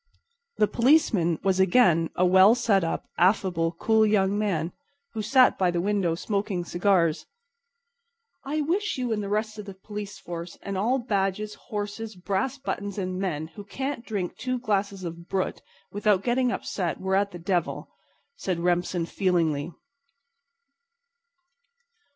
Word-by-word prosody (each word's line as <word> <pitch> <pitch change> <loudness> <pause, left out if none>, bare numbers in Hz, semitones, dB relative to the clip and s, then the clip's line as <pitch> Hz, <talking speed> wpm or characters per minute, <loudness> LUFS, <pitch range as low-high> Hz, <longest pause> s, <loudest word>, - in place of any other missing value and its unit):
The - - +5
policeman 230 - +3
was 190 -1 +2
again 175 -4 +4
a 185 - +3
well 190 +5 +7
set 215 -6 +2
up, 165 - -2
affable, 175 -3 +2
cool 220 +5 +2
young 200 -2 +2
man 185 -6 -1 0.4
who 220 - -3
sat 255 +4 +4
by 185 -2 +3
the 175 0 0
window 190 -3 +1
smoking 200 -1 -2
cigars. 175 -3 +1 1.2
"I 300 +3 -1
wish 365 +7 -1
you 250 -3 -1
and 210 - -2
the 200 - -4
rest 215 +1 -2
of 210 - -7
the 195 -2 -9
police 205 +1 -7
force 170 0 -7
and 200 - -4
all 225 +7 +1
badges, 210 -3 -1 0.2
horses, 210 0 -4
brass 195 +8 -2
buttons 205 -7 -4
and 185 -1 -3
men 160 -5 -2
who 205 - -10
can't 265 +5 -4
drink 200 -7 -3
two 255 0 -2
glasses 200 -5 -1
of 170 0 -7
brut 190 -1 -2 0.3
without 205 -1 +2
getting 250 0 +1
upset 180 -8 -3
were 190 0 -2
at 200 +1 +2
the 175 - -9
devil," 175 -1 -2 0.5
said 190 - -2
Remsen 175 0 0
feelingly. 165 -5 0
195 Hz, 145 wpm, -26 LUFS, 175-215 Hz, 1.2 s, well